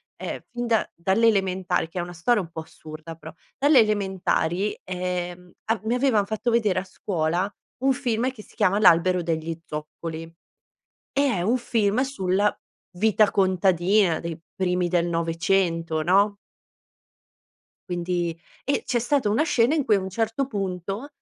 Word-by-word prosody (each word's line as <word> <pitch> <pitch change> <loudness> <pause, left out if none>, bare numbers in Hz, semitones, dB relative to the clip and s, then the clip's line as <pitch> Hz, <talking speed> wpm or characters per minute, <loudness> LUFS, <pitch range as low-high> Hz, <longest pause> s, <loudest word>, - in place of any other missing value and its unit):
ehm, - - -5
fin 240 0 -4
da 225 -2 +1
dalle 190 +7 +2
elementari, 190 -5 +1
che 180 - -5
è - - 0
una 175 0 -6
storia 210 +8 +2
un 170 - -9
po' 165 -1 -6
assurda, 155 +1 -10
però 160 -1 -11 0.2
dalle 285 0 +5
elementari, 195 -3 0
ehm, 180 -1 -4
a 225 0 0
mi 225 +2 0
avevan 250 -6 +2
fatto 220 +4 -2
vedere 215 -6 +2
a - - -5
scuola 180 +1 -2 0.3
un 270 - +4
film 250 -2 0
che 245 -4 -12
si - - -20
chiama 195 +3 +2
L'albero 180 -1 +5
degli 165 -1 -3
zoccoli, 160 +2 -6 0.9
e 280 - +2 0.2
è - - -1
un 220 +8 +2
film 225 -2 +1
sulla 205 -7 +1 0.4
vita 215 +1 +3
contadina 185 -1 +3
dei 170 -2 -5 0.2
primi 180 -1 0
del 175 -1 +1
'900, 165 -1 0
no 200 +5 +3 1.5
quindi 175 -1 -2 0.3
e, 280 - 0
c'è 240 - +1
stata 245 -1 +1
una 220 +8 +2
scena 250 -4 +2
in 300 -4 +1
cui 215 - +4
a 195 - 0
un 190 - -5
certo 225 +6 -1
punto, 195 +1 -4
190 Hz, 155 wpm, -24 LUFS, 175-220 Hz, 1.5 s, dalle